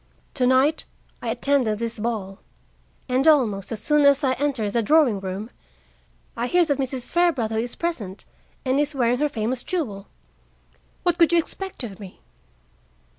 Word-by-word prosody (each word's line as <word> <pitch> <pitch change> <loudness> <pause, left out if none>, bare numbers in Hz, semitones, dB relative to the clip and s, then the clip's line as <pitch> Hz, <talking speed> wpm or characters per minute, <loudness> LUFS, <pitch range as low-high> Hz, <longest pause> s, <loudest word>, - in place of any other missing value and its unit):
Tonight 260 +3 +2 0.4
I - - -3
attended 260 -7 +1
this 230 0 -4
ball, 210 -3 -3 0.7
and 260 +3 +1
almost 230 -11 +3
as 220 -1 -4
soon 300 +2 +3
as 280 +1 +5
I 260 -2 +3
enter 260 -7 -1
the 235 - +1
drawing 265 -4 +3
room 195 +4 -5 0.8
I 240 - -2
hear 355 +4 +3
that 285 -3 -1
Mrs. 260 -2 -3
Fairbrother 270 -11 +1
is 240 +1 -4
present 220 - -4 0.4
and 260 +2 +2
is 295 0 0
wearing 245 -1 +1
her 300 0 +1
famous 235 0 -2
jewel. 220 - -3 1.0
What 350 -2 +1
could 335 -1 +5
you 345 - +4
expect 375 -1 -3
of 205 -4 -7
me? 195 -3 -11
255 Hz, 155 wpm, -23 LUFS, 220-295 Hz, 1.0 s, as